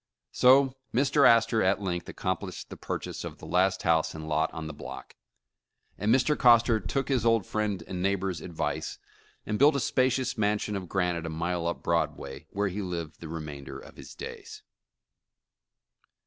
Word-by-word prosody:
So 130 +1 +5 0.2
Mr. 140 +2 +4
Astor 115 -1 +4
at 95 +2 +2
length 90 -3 -3
accomplished - - -4
the - - -6
purchase - - -5
of - - -7
the - - -11
last 95 +1 +1
house 80 -2 +2
and 80 0 -7
lot 80 +1 +1
on 80 -1 -6
the 80 - -6
block, - - -9 0.8
and 105 +3 0
Mr, 135 +4 +3
Coster 120 -3 +5
took 130 +8 -2
his 130 -5 +1
old 115 -4 +3
friend 105 -3 -2
and 90 -1 -5
neighbor's 95 -2 -1
advice, 85 -3 -3 0.5
and 105 0 -2
built 145 +2 +6
a - - +1
spacious 130 0 +1
mansion 105 0 0
of 95 -3 -5
granite 90 -3 0
a - - -3
mile 85 +2 -2
up 85 - -3
Broadway, 85 -5 -2
where 100 0 -1
he 100 +3 -4
lived 85 -4 -5
the 85 - -8
remainder 75 -4 -6
of - - -13
his - - -11
days. - - -9
95 Hz, 170 wpm, -28 LUFS, 85-115 Hz, 0.8 s, built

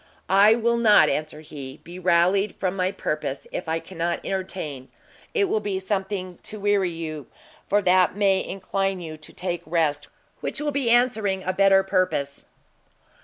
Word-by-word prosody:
"I 205 +3 +6
will 235 0 +1
not," 210 -9 +6
answered 155 +2 -3
he, 140 -2 -9
"be 175 +2 -10
rallied 185 +3 +2
from 185 0 -2
my 185 0 0
purpose; 150 -7 -3
if 175 - -4
I 160 - +1
cannot 170 -1 -3
entertain, 180 -9 -4 0.5
it 425 - +3
will 360 - +1
be 205 -2 -2
something 190 -2 -3
to 215 - -8
weary 200 -2 +2
you, 155 -4 -6 0.4
for 205 0 +3
that 185 0 +4
may 195 -2 +2
incline 195 0 -2
you 160 -3 -7
to 155 - -14
take 175 -2 -4
rest, 155 -3 0 0.3
which - - -4
will 295 -1 -2
he 270 -4 0
answering 220 -6 +2
a 185 - -1
better 195 0 +5
purpose." 185 -7 -1
185 Hz, 165 wpm, -24 LUFS, 165-200 Hz, 0.5 s, I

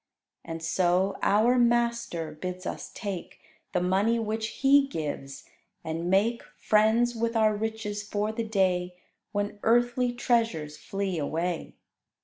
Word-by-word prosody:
And 165 0 -6
so 180 +3 +2
our 230 +5 +4
Master 235 -9 +1
bids 180 +4 -6
us - - -5
take 200 -5 -6 0.3
The 180 - 0
money 195 +6 +2
which 220 0 -2
He 275 +4 +4
gives, 145 - -5 0.4
and 165 +2 -3
make 215 +5 +2 0.2
Friends 220 +3 +3
with 230 0 -1
our 215 -1 +3
riches 215 -1 -3
for 210 +1 -2
the 230 +1 -3
day 185 -4 0 0.4
When 205 0 -2
earthly 240 +2 +2
treasures 225 -12 0
flee 195 -2 -3
away. 165 +4 -2
210 Hz, 125 wpm, -27 LUFS, 180-230 Hz, 0.4 s, our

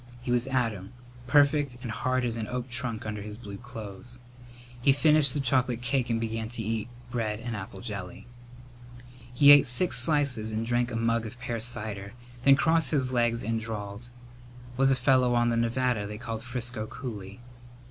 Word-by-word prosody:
He 125 - -2
was 125 +1 +2
Adam, 115 -6 -1 0.3
perfect 145 -1 +3
and 120 - -4
hard 130 +2 0
as 115 -1 -1
an 110 -2 -4
oak 125 0 -4
trunk 120 -3 -3
under 105 -1 -4
his 105 +1 -7
blue 100 -4 -8
clothes. 110 +4 -9 0.6
He 135 - +5
finished 150 -2 +4
the - - 0
chocolate 125 -2 +1
cake 125 -1 0
and 115 -1 +1
began 115 -1 -3
to 120 -1 -4
eat 110 0 -2 0.2
bread 110 -3 -2
and 120 -1 -4
apple 95 -1 -7
jelly. 100 -6 -7 1.1
He 140 +3 +7
ate 145 -2 +8
six 125 +9 +1
slices 140 -8 0
and 110 +1 -2
drank 120 +1 +1
a 120 - -5
mug 115 0 0
of 120 +3 -11
pear 120 -2 -3
cider, 105 -4 -4 0.3
then 140 0 +7
crossed 160 0 +3
his 130 -4 +1
legs 120 -1 +1
and 115 +1 -1
drawled, 110 +1 -6 0.7
"Was 135 +1 +3
a 135 - +4
fellow 130 -1 +3
on 120 0 +3
the 115 - +1
Nevada 115 -2 0
they 105 0 -6
called 115 -1 -5
Frisco 120 -2 -4
Cooley." 105 -5 -7
120 Hz, 180 wpm, -28 LUFS, 110-130 Hz, 1.1 s, ate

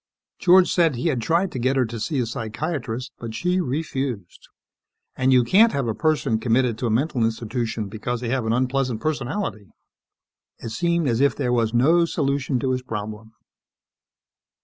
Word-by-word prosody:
George 185 0 +5
said 165 -6 +3
he 125 +8 -1
had 130 -6 -1
tried 170 +9 +1
to 130 - -5
get 130 +3 +1
her 130 -2 +2
to 115 0 -6
see 140 +7 -2
a 125 - +1
psychiatrist 125 +2 -4
but 115 -2 -6
she 180 +8 0
refused. 135 - -4 0.7
And 130 0 +2
you 125 -1 +5
can't 215 - +5
have 140 -4 -1
a 110 - 0
person 150 -6 0
committed 120 +1 +1
to 125 - -1
a - - 0
mental 125 +2 0
institution 115 -1 -2
because 115 +4 -4
they 120 -1 -4
have 125 -2 -1
an - - +1
unpleasant 125 -1 0
personality! 150 - -3 0.9
It 115 - -7
seemed 170 +6 0
as 120 0 +1
if 140 -2 +3
there 125 - -1
was 115 -2 +1
no 155 +9 +4
solution 140 -4 -1
to 130 -2 0
his 130 0 -1
problem. 110 -2 -6
125 Hz, 175 wpm, -23 LUFS, 115-150 Hz, 0.9 s, George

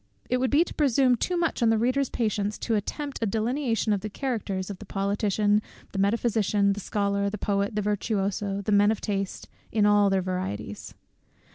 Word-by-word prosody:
It 250 - +3
would 255 0 +1
be 295 +4 +5
to - - -9
presume 265 -3 +3
too 355 +9 -1
much 335 -6 0
on 230 - +4
the 225 - +3
reader's 255 +4 +1
patience 210 -2 -1
to 230 - -2
attempt 275 +7 -3
a 225 - +1
delineation 225 +1 0
of 200 - -1
the 215 - -4
characters 205 -6 -3
of 195 - -8
the 210 - -10
politician, 205 +1 +1 0.3
the 195 - -4
metaphysician, 205 -1 +2
the 200 - -6
scholar, 200 0 0
the 210 - -5
poet, 200 +1 -1
the 210 - 0
virtuoso, 200 -1 -1
the 210 - -1
man 205 0 +5
of 220 - 0
taste, 195 -2 -3 0.2
in 210 -1 +3
all 205 -1 +5
their 190 -1 +1
varieties. 105 - -4
210 Hz, 190 wpm, -26 LUFS, 200-230 Hz, 0.3 s, be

